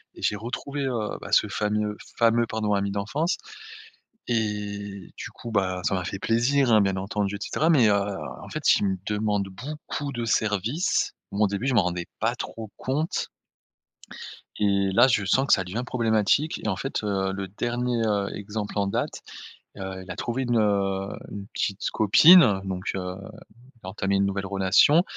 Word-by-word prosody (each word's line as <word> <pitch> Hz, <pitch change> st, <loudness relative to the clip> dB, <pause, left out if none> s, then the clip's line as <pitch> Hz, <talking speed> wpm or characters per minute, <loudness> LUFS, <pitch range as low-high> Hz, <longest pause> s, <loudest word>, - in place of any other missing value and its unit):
et -, -, -12 dB
j'ai 105 Hz, -, +1 dB
retrouvé, 125 Hz, +6 st, -5 dB
heu, 115 Hz, -5 st, -2 dB
bah, -, -, -8 dB
ce -, -, +4 dB
fameux- 105 Hz, 0 st, -1 dB, 0.2 s
fameux, 115 Hz, 0 st, +4 dB
pardon, 105 Hz, -2 st, -1 dB
ami 100 Hz, 0 st, 0 dB
d'enfance 140 Hz, -, -1 dB, 0.9 s
et 105 Hz, -4 st, -3 dB
du -, -, -7 dB
coup, 120 Hz, -, -8 dB
bah, 95 Hz, -3 st, 0 dB
ça -, -, +1 dB
m'a 90 Hz, -1 st, -1 dB
fait 95 Hz, -, -4 dB
plaisir, 120 Hz, +4 st, +2 dB
hein, 110 Hz, -, +6 dB
bien 95 Hz, -1 st, +1 dB
entendu 100 Hz, +1 st, -2 dB
et -, -, -8 dB
cetera 160 Hz, +9 st, 0 dB
mais 130 Hz, -9 st, +5 dB
heu, -, -, +4 dB, 0.5 s
en -, -, -10 dB
fait, -, -, +3 dB
il -, -, 0 dB
me 95 Hz, -, 0 dB
demande 105 Hz, -1 st, 0 dB
beaucoup 145 Hz, +6 st, -6 dB
de 120 Hz, -2 st, -3 dB
service, 110 Hz, -, 0 dB, 0.2 s
moi, 105 Hz, +2 st, +1 dB
au -, -, +3 dB
début, 100 Hz, +6 st, -3 dB
je 130 Hz, -, +1 dB
m'en 110 Hz, -, +5 dB
rendais 90 Hz, -1 st, -2 dB
pas 115 Hz, +2 st, +1 dB
trop 110 Hz, -3 st, -7 dB
compte 145 Hz, +5 st, -1 dB, 1.3 s
et 100 Hz, -2 st, +2 dB
là 120 Hz, +5 st, +6 dB
je 115 Hz, -6 st, +1 dB
sens 135 Hz, +7 st, +2 dB
que -, -, +5 dB
ça 95 Hz, -, +3 dB
devient 105 Hz, +7 st, -4 dB
problématique 115 Hz, +5 st, +1 dB
et -, -, 0 dB
en 95 Hz, -, 0 dB
fait 135 Hz, -4 st, -3 dB
heu, 95 Hz, -2 st, -1 dB
le 95 Hz, 0 st, -4 dB
dernier, 120 Hz, +3 st, -2 dB
heu, 100 Hz, -2 st, 0 dB
exemple 105 Hz, +1 st, -5 dB
en 100 Hz, -1 st, +1 dB
date, 100 Hz, -, -2 dB, 0.6 s
heu, 95 Hz, -1 st, -6 dB
il 95 Hz, -, -9 dB
a -, -, -5 dB
trouvé 125 Hz, +3 st, -2 dB
une, 120 Hz, -1 st, +1 dB
heu, 100 Hz, -2 st, +1 dB, 0.2 s
une 100 Hz, -1 st, -7 dB
petite 100 Hz, 0 st, -2 dB
copine, 110 Hz, -, +7 dB
donc 95 Hz, -1 st, -4 dB
heu, 90 Hz, -1 st, -4 dB, 0.5 s
il 125 Hz, -2 st, -23 dB
a 95 Hz, -, -6 dB
entamé 95 Hz, +1 st, -1 dB
une 100 Hz, 0 st, +3 dB
nouvelle 100 Hz, 0 st, -2 dB
relation 100 Hz, -, +4 dB
105 Hz, 185 wpm, -25 LUFS, 100-120 Hz, 1.3 s, copine